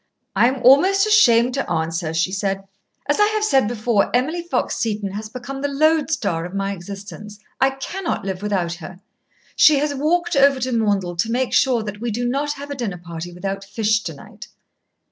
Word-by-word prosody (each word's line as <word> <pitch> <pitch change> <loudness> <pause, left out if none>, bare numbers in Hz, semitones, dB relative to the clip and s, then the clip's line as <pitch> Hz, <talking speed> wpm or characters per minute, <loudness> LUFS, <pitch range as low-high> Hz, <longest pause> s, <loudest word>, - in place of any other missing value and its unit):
"I 220 +5 +5
am 260 0 -2
almost 375 - +5
ashamed 250 - +5
to 275 - -2
answer," 165 0 -2
she 165 +3 0
said. 195 0 -2 0.4
"As 290 - +1
I 415 - +5
have 430 - 0
said 270 - +3
before, 220 -2 +1
Emily 310 +8 0
Fox 345 - -2
Seton 210 -3 -2
has 210 +2 -6
become 260 +3 -7
the 285 - 0
lodestar 285 - +1
of 180 +3 -7
my 195 0 -1
existence. 200 +2 -9 0.2
I 265 - +4
cannot 270 - -4
live 190 -1 -4
without 190 -5 -1
her. 180 +1 -10 0.6
She 305 -2 +6
has 290 +1 0
walked 345 +5 0
over 275 -1 +4
to 255 +1 -1
Maundell 200 -6 0
to 225 +7 0
make 255 +1 -1
sure 245 -4 +3
that 210 0 -7
we 240 - -2
do 240 +3 -2
not 285 +4 -1
have 285 0 -9
a - - -3
dinner 225 -8 -4
party 170 0 -8
without 195 +2 -5
fish 215 +1 0
to - - -6
night." - - -12
230 Hz, 195 wpm, -21 LUFS, 195-275 Hz, 0.6 s, She